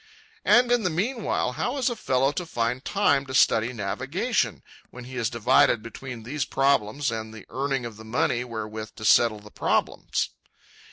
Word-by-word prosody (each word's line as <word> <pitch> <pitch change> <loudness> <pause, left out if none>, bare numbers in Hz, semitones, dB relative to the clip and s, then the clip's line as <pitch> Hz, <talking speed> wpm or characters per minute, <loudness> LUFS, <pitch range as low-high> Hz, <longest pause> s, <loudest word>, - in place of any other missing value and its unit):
And 245 0 +5
in 245 -1 +4
the 185 - +1
meanwhile 205 - -1
how 245 - -2
is 260 - 0
a 240 - 0
fellow 135 - +1
to 175 +4 -4
find 120 -1 -1
time 145 -9 +2
to 130 - -4
study 115 -1 +4
navigation—when 115 +3 -3
he 130 +1 -9
is 115 -3 0
divided 115 -1 +3
between 120 0 -8
these 140 +5 -2
problems 135 -1 +1
and 110 -1 -5
the 110 -3 -11
earning 135 -1 -1
of 115 -3 -7
the 110 - -11
money 120 +1 0
wherewith 110 -2 -6
to 110 - -7
settle 110 -1 +4
the 105 0 -14
problems? - - 0
125 Hz, 170 wpm, -25 LUFS, 110-145 Hz, -, And